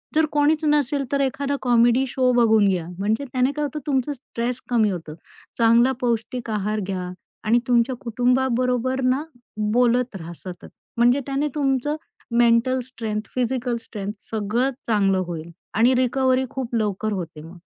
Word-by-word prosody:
जर 315 0 +4
कोणीच 300 +2 +2
नसेल, 290 -2 +2
तर 280 - +1
एखादा 275 +1 -1
कॉमेडी 240 +1 +4
शो 255 0 +1
बघून 220 -4 +4
घ्या. 180 -4 0
म्हणजे 220 +7 0
त्याने 255 +1 +2
काय 300 +1 -3
होतं, 295 +1 -4
तुमचं 270 0 +1
स्ट्रेस 245 -1 -4
कमी 225 -4 +3
होतं. 160 -4 -6 0.4
चांगला 235 +2 +5
पौष्टिक 240 0 -2
आहार 210 0 -1
घ्या 185 -2 -3 0.3
आणि 230 +2 +3
तुमच्या 245 +1 +2
कुटुंबाबरोबर 250 +1 +1
ना, 260 +3 +1 0.5
बोलत 245 -1 +2
रहा 170 -2 -7
सतत 180 0 -9 0.3
म्हणजे 245 +3 +4
त्याने 280 +2 -1
तुमचं 280 0 0 0.4
मेंटल 240 +2 +4
स्ट्रेन्थ, 220 -4 -5
फिजिकल 250 -1 0
स्ट्रेन्थ 210 -2 -6
सगळं 225 +5 0 0.2
चांगलं 195 -3 +2
होईल 170 -1 -6 0.3
आणि 240 +4 +5
रिकव्हरी 255 +1 +2
खूप 255 -3 -4
लवकर 215 -1 -1
होते 170 -5 -5
मग. 165 +3 -12
240 Hz, 150 wpm, -23 LUFS, 215-260 Hz, 0.5 s, चांगला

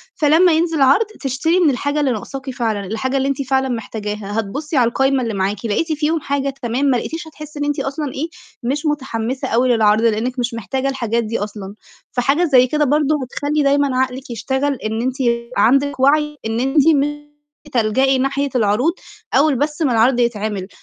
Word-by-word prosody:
فلمّا 320 +4 +4
ينزل 325 -2 +1
عَرْض، 275 +12 +5 0.2
تشتري 280 +6 +1
من 340 -4 +4
الحاجة 285 +3 -1
اللي 280 -3 +1
ناقصاكِ 265 +4 -5
فعلًا، 220 -5 -2
الحاجة 260 +7 -2
اللي 270 +1 0
أنتِ 275 0 -1
فعلًا 265 0 0
محتاجاها. 210 -2 -4
هتبُصّي 285 +9 -3
على 240 - +4
القايمة 270 +2 +1
اللي 230 -2 -2
معاكِ، 195 +2 -2
لقيتِ 310 +10 0
فيهم 310 +2 0
حاجة 280 -1 -1
تمام، 245 +4 -1
ما 260 -3 +3
لقيتيش 325 +6 -5
هتحسّي 305 -1 -10
إن 290 - -1
أنتِ 290 0 -1
أصلًا 280 0 -3
إيه، 310 +5 -3 0.4
مش 285 +6 -2
متحمّسة 260 -4 -2
أوي 250 +3 +2
للعَرْض 215 -1 +3
لإنِّك 230 +3 0
مش 245 0 -1
محتاجة 245 +5 -2
الحاجات 235 -3 -1
دي 225 +1 -3
أصلًا. 205 -1 -6 0.4
فحاجة 275 +7 +1
زي 260 -6 +5
كده 300 +3 +1
برضه 295 +2 +2
هتخلّي 290 +4 -1
دايمًا 280 -2 +2
عقلِك 260 0 -2
يشتغل 265 +5 -1
إن 220 -2 -3
أنتِ 255 +1 -1 0.4
عندِك 275 +3 +3
وَعْي 300 +2 +2
إن 225 +1 -1
أنتِ 255 - +1 0.2
ممكن 295 -1 +1 0.5
تلجئي 260 +4 +2
ناحية 275 +2 0
العروض 235 +8 +2 0.4
أول 280 +1 +4
بس 295 +4 -2
ما 280 -6 +2
العَرْض 240 +2 +3
يتعمل. 215 -5 -1
265 Hz, 180 wpm, -19 LUFS, 230-290 Hz, 0.5 s, عَرْض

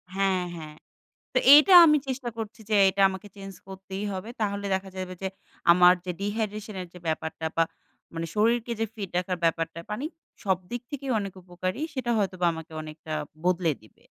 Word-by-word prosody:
হ্যাঁ, 195 -2 +1
হ্যাঁ। 155 -2 -9 0.6
তো, - - +5 0.2
এটা 305 +6 +6
আমি 300 -1 +5
চেষ্টা 260 -1 -3
করছি 220 -2 -6
যে, - - +3 0.2
এটা 195 +1 +1
আমাকে 190 +2 -7
চেঞ্জ 195 -1 -9
করতেই 190 +1 -6
হবে। 190 +3 -5
তাহলে 200 -1 -1
দেখা 190 0 -3
যাবে 185 -1 -5
যে, 190 - 0 0.4
আমার 180 +1 +7
যে 185 - -3
dyhydration 210 +1 -3
এর 180 - -5
যে - - -9
ব্যাপারটা 160 0 -2
বা, 165 - +5 0.5
মানে 165 0 -3
শরীরকে 230 +2 +2
যে - - +3
ফিট 200 -4 -6
রাখার 180 0 -2
ব্যাপারটা, 165 0 0
পানি 210 +7 -3 0.4
সবদিক 190 +5 -1
থেকেই 275 -2 -4
অনেক 200 -2 -4
উপকারী। 185 +5 -4
সেটা 255 -3 -2
হয়তোবা 185 -3 0
আমাকে 160 0 -9
অনেকটা 155 0 -9 0.3
বদলে 180 -2 +2
দিবে। 110 - -22
190 Hz, 175 wpm, -27 LUFS, 180-215 Hz, 0.6 s, আমার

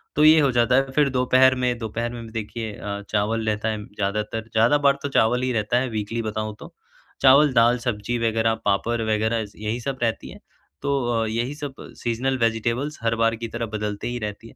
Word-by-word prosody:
तो 150 - +3
ये 155 +1 +8
हो 140 -3 +3
जाता 120 +1 +3
है 135 0 +2
फिर 150 -2 +4
दोपहर 130 0 +4
में 125 -1 +1
दोपहर 115 +1 -3
में 120 - -7
भी 110 - -11
देखिए 110 0 -5
अ, 100 0 -5
चावल 110 +2 0
रहता 110 +1 0
है 110 -1 -3
ज़्यादातर, 105 +2 -3
ज़्यादा 115 +6 +4
बार 140 -1 +3
तो 145 - -2
चावल 125 -1 +2
ही 130 - 0
रहता 110 +1 0
है 130 0 -2
वीकली 110 +1 -3
बताऊँ 110 -1 -4
तो। - - -11 0.5
चावल, 140 +1 +6
दाल, 120 +1 +4
सब्ज़ी 120 -1 -2
वग़ैरह, 115 0 +1
पापड़ 115 +4 +1
वग़ैरह 110 +1 0
ज़ 105 - -15
यही 110 +3 -3
सब 135 +2 -4
रहती 115 -1 -2
है, - - -12 0.4
तो 140 -1 0 0.2
अ, - - 0
यही 120 +5 -2
सब 145 -2 -6 0.3
सीज़नल 125 +3 0
वेजिटेबल्स 120 +5 -1
हर 115 0 +1
बार 115 0 +2
की 115 +1 -5
तरह 115 +1 -4
बदलते 105 -1 -4
ही 120 0 -3
रहती 105 +1 -6
हैं। - - -16
115 Hz, 215 wpm, -23 LUFS, 110-125 Hz, 0.5 s, ये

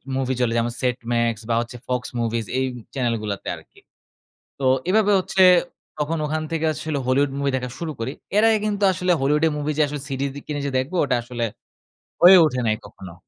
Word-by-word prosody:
Movie 130 -1 0
চলে 115 -2 +1
যেমন 120 +1 0
set 125 -1 0
মাক্স 115 -2 0
বা 115 - +2
হচ্ছে 120 +1 -7
ফক্স 125 -1 -2
মুভিস 115 -1 -1
এই 130 - +1 0.3
চ্যানেলগুলাতে 115 -6 -2
আরকি। - - -18 0.8
তো 135 - -2 0.2
এভাবে 210 +1 +3
হচ্ছে 190 0 +2 0.6
তখন 155 +2 -1
ওখান 155 +1 -2
থেকে 160 -1 -1
আসলে 155 -1 -3
হলিউড 135 +2 +2
মুভি 140 0 0
দেখা 125 -1 -3
শুরু 165 -2 -3
করি। 115 +3 -3 0.3
এর 215 - +5
আগে 220 -1 +3
কিন্তু 205 -1 -1
আসলে 180 0 0
হলিউডের 150 +3 +2
মুভি 150 +1 -2
যে - - +6 0.2
CD 135 -1 -4 0.2
কিনে 145 -1 -4
যে 140 - -2
দেখবো 130 +8 -2
ওটা 130 -3 +1
আসলে 120 -1 -3 0.8
হয়ে 185 +2 +10
ওঠে 125 -4 -1
নাই 110 - +2
কখনো 95 -3 -11
135 Hz, 185 wpm, -22 LUFS, 120-155 Hz, 0.8 s, হয়ে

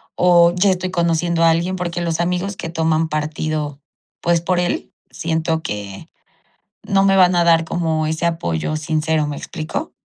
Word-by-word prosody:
o 175 -1 +5
ya 190 +2 +3
estoy 185 0 -2
conociendo 170 -1 +1
a 165 - +6
alguien", 170 +3 0
porque 175 -1 -3
los 170 -1 -1
amigos 180 +3 -2
que - - -5
toman 160 -1 +1
partido, 155 -1 -3 0.4
pues 170 -1 +2
por 180 +1 0
él 175 0 -2 0.2
siento 160 0 -1
que 100 - -6 0.7
no 195 0 +2
me 195 0 +4
van 185 -1 +5
a 175 - +3
dar 165 -1 +4
como 160 -2 -1
ese 160 +2 -1
apoyo 155 - -2
sincero, 155 0 0
¿me 145 -1 -4
explico? 155 0 -5
165 Hz, 165 wpm, -19 LUFS, 155-175 Hz, 0.7 s, a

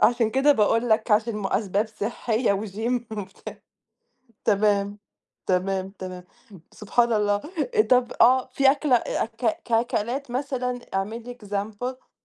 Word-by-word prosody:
عشان 235 -1 +3
كده 270 +4 +4
باقول 230 +1 +2
لك، 220 +1 +2
عشان 215 +1 +2
مو 195 -2 -2
أسباب 205 +1 0
صحية 220 +1 -1
وGym 220 +4 -2 0.2
وبتاع 190 -1 -8 0.9
تمام، 205 -1 +2 0.5
تمام، 190 +1 0
تمام. 185 -2 -8 0.5
سبحان 235 +3 +1
الله! 205 -1 +2 0.4
آآ، 430 - +4
طَب 250 - +2
آه 255 +2 +6
في 270 +1 +4
أكلة 285 -3 +2
أ - - -1
أك 225 0 -2
ك 235 - -9
أكلات 240 +3 0
مثلًا 250 -1 -2 0.2
اعمل 210 +5 -2
لي 245 0 -9
example. 215 +6 -5
225 Hz, 135 wpm, -25 LUFS, 205-245 Hz, 0.9 s, آه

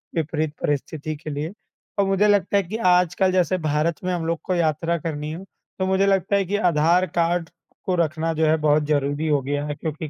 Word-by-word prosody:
विपरीत 155 -1 -1
परिस्थिति 150 +2 -2
के 155 +1 -8
लिए 150 +4 -4 0.5
और 200 - +4
मुझे 195 +2 +2
लगता 205 0 +3
है 200 - +2
कि 195 +5 -5 0.2
आजकल 180 +1 +2
जैसे 185 0 +2
भारत 155 +2 +1
में 185 - -1
हम 170 -2 -2
लोग 165 0 -1
को 185 - -1
यात्रा 165 0 0
करनी 150 -1 -4
हो, 170 +4 -7 0.4
तो 190 - +1
मुझे 190 +1 +2
लगता 195 0 +2
है 200 -1 +2
कि 195 +3 -2
आधार 170 +3 +3
कार्ड 170 0 +1 0.4
को 185 - +1
रखना, 165 -1 0
जो 160 0 +1
है, 155 0 +4
बहुत 150 0 +2
ज़रूरी 145 +1 0
हो 145 -2 +2
गया 145 +2 -2
है, 150 0 -4
क्योंकि 155 +1 -5
165 Hz, 215 wpm, -23 LUFS, 150-180 Hz, 0.5 s, और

